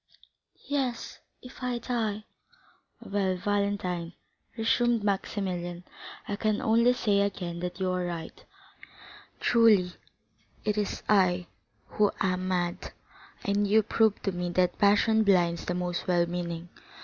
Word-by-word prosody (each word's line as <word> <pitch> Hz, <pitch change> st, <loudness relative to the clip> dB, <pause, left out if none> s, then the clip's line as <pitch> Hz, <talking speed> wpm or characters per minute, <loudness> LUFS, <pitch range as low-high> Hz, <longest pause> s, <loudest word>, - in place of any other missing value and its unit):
"Yes,—if 255 Hz, -1 st, -5 dB
I 250 Hz, -1 st, -1 dB
die!" 225 Hz, -3 st, -2 dB, 0.8 s
"Well, 195 Hz, -2 st, -1 dB
Valentine," 185 Hz, -3 st, -1 dB, 0.4 s
resumed 230 Hz, 0 st, +2 dB
Maximilian, 185 Hz, -3 st, -2 dB, 0.4 s
"I 205 Hz, -, -3 dB
can 215 Hz, -1 st, 0 dB
only 235 Hz, +2 st, +4 dB
say 210 Hz, -5 st, +1 dB
again 180 Hz, -4 st, -2 dB
that 180 Hz, +1 st, -5 dB
you 185 Hz, -1 st, 0 dB
are 185 Hz, 0 st, -1 dB
right. 170 Hz, -2 st, -7 dB, 1.0 s
Truly, 210 Hz, -6 st, +4 dB, 0.7 s
it 210 Hz, -1 st, +1 dB
is 210 Hz, -1 st, -2 dB
I 185 Hz, -3 st, +3 dB, 0.4 s
who 210 Hz, -1 st, +2 dB
am 185 Hz, -1 st, 0 dB
mad, 175 Hz, -2 st, -2 dB, 0.5 s
and 205 Hz, 0 st, +1 dB
you 215 Hz, +2 st, +4 dB
prove 220 Hz, 0 st, +2 dB
to 195 Hz, -, 0 dB
me 180 Hz, -1 st, -3 dB
that 180 Hz, -1 st, +1 dB
passion 210 Hz, +2 st, +4 dB
blinds 175 Hz, -4 st, +2 dB
the 180 Hz, -, -2 dB
most 180 Hz, 0 st, -3 dB
well 175 Hz, -1 st, +3 dB
meaning. 170 Hz, 0 st, -4 dB
200 Hz, 125 wpm, -28 LUFS, 180-215 Hz, 1.0 s, only